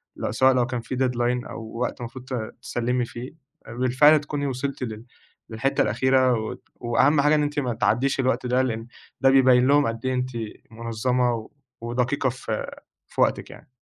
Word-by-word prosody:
لو - - -3
سواء 130 +4 +4
لو 125 -1 +2
كان 125 -2 -3
في 130 - -5
deadline، 125 -1 0
أو 110 -1 -8
وقت 125 +1 -2
المفروض 120 +1 -8
ت 130 - -7 0.3
تسلمي 120 0 -1
فيه، 120 +2 -8 0.4
بالفعل 130 +6 +4
تكوني 145 -1 -3
وصلتِ 135 +1 -3
لل 110 0 -6 0.4
للحتة 120 +5 0
الأخيرة 130 +3 +3
و 110 -1 -3 0.2
وأهم 130 +5 +2
حاجة 150 +2 +4
إن 150 - +2
أنتِ 145 0 -1
ما 125 -4 -1
تعدّيش 135 +5 +1
الوقت 130 -1 +1
ده، 125 +1 +2
لأن 115 -2 -2 0.3
ده 135 - +6
بيبين 130 -1 +5
لهم 145 -3 +4
قد 115 +2 -4
إيه 130 - +1
أنتِ 125 0 -1 0.4
منظمة 115 +1 -1 0.3
ودقيقة 125 +3 0
في 115 -3 -4 0.4
في - - -3
وقتِك - - +1
يعني. - - -14
125 Hz, 175 wpm, -24 LUFS, 120-130 Hz, 0.4 s, ده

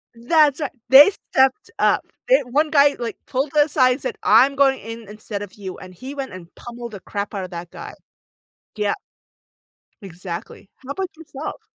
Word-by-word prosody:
That's 295 +4 +3
ri 300 - -1 0.2
they 280 +7 +10 0.2
stepped 265 +10 +2
up. - - +3 0.3
They - - +6
one 290 +6 0
guy, 285 -1 +4
like, 230 -3 -4
pulled 275 +2 -2
aside 290 -4 +4
and 260 - -8
said, 460 -4 -4
"I'm 275 -8 +5
going 270 -1 +3
in 225 0 -9
instead 210 0 -7
of 205 -2 -8
you." 190 -3 -8
And 185 - -12
he 260 +10 -9
went 270 -5 -5
and 180 -2 -11
pummeled 240 -1 -9
the 200 - -8
crap 200 +2 -5
out 195 -2 -3
of 185 - -8
that 170 0 -7
guy. - - -9 0.8
Yep. 210 -1 -1 1.0
Exactly. 180 0 -8
How 265 - -9
about 375 +5 -3
yourself? 305 -2 -8
255 Hz, 180 wpm, -21 LUFS, 200-285 Hz, 1.0 s, they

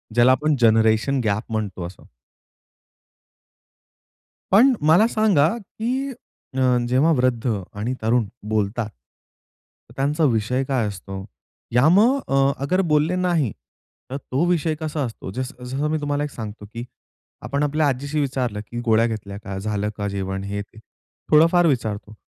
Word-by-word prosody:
ज्याला 120 +2 +6
आपण 150 +3 +2
generation 110 +4 +3
gap 110 +2 -1
म्हणतो 105 -5 -3
असं. 90 - -14 2.5
पण 245 +8 +6
मला 165 +9 +5
सांगा, 210 -10 +3
की 245 +6 -3 0.5
अ, 130 -1 +3
जेव्हा 135 +6 +3
वृद्ध 125 -4 +1 0.3
आणि 115 +5 -1
तरुण 115 +1 +2 0.2
बोलतात, 110 +1 -1
तर 65 - -29
त्यांचा 145 +4 0
विषय 115 +4 0
काय 130 -5 0
असतो? 95 -1 -7 0.5
या 125 +5 +5
मग 225 +10 +5
अ, 135 0 +3
अगर 185 +7 +2
बोलले 150 +4 +3
नाही 175 - +1 0.6
तर 135 - -3
तो 140 +3 -1
विषय 165 -2 +1
कसा 155 -1 -3
असतो. 110 -5 -7
जस 130 +6 -4
जसं 135 +4 -2
मी 155 - +1
तुम्हाला 145 0 -1
एक 150 - -3
सांगतो, 105 -2 -7
की 120 +1 -5 0.6
आपण 140 +1 -1
आपल्या 150 +1 +1
आजीशी 145 +3 -1
विचारलं, 130 -6 -2
की 120 - -6
गोळ्या 115 0 +4
घेतल्या 100 -3 -5
का? 95 0 -5
झालं 105 0 -2
का 100 -1 -2
जेवण 95 -1 -3
हे, 100 +1 -3
ते 100 - -14 0.5
थोडं 155 +2 +7
फार 175 -1 +4
विचारतो. 110 -6 -2
130 Hz, 150 wpm, -22 LUFS, 110-150 Hz, 2.5 s, थोडं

